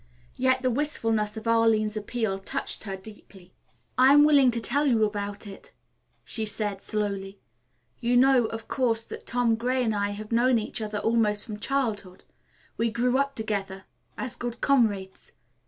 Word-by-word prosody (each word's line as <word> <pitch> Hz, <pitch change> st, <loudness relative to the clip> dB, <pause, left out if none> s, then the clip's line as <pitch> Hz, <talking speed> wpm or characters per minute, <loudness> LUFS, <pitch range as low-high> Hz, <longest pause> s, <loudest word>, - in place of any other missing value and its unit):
Yet 260 Hz, 0 st, +1 dB
the 255 Hz, -, +2 dB
wistfulness 225 Hz, -6 st, 0 dB
of 220 Hz, -, -7 dB
Arline's 225 Hz, -2 st, +3 dB
appeal 215 Hz, -2 st, -2 dB
touched 195 Hz, -, -5 dB
her 195 Hz, -2 st, -4 dB
deeply. 190 Hz, -2 st, -15 dB, 0.5 s
"I 260 Hz, +2 st, +7 dB
am 290 Hz, 0 st, +7 dB
willing 285 Hz, -4 st, +6 dB
to 235 Hz, -1 st, -1 dB
tell 285 Hz, +6 st, 0 dB
you 225 Hz, -5 st, +3 dB
about 205 Hz, 0 st, -4 dB
it," 195 Hz, -1 st, -10 dB, 0.5 s
she 220 Hz, -, -2 dB
said 210 Hz, -2 st, -3 dB
slowly. 200 Hz, -2 st, -3 dB, 0.6 s
"You 240 Hz, +1 st, +2 dB
know, 260 Hz, -1 st, +5 dB
of 225 Hz, 0 st, -7 dB
course, 230 Hz, -4 st, 0 dB
that -, -, -10 dB
Tom 240 Hz, -1 st, +2 dB
Gray 250 Hz, +3 st, 0 dB
and 225 Hz, -2 st, 0 dB
I 205 Hz, 0 st, 0 dB
had 210 Hz, +2 st, -7 dB
known 240 Hz, +2 st, +3 dB
each 220 Hz, +1 st, -4 dB
other 210 Hz, -1 st, -3 dB
almost 215 Hz, -1 st, +1 dB
from 210 Hz, -4 st, -7 dB
childhood. 210 Hz, -8 st, -2 dB, 0.5 s
We 230 Hz, 0 st, +1 dB
grew 245 Hz, +3 st, +1 dB
up 275 Hz, 0 st, -1 dB
together 200 Hz, -4 st, -3 dB, 0.3 s
as 255 Hz, -, -4 dB
good 240 Hz, -1 st, -5 dB
comrades. 205 Hz, -9 st, 0 dB
225 Hz, 165 wpm, -26 LUFS, 210-245 Hz, 0.6 s, I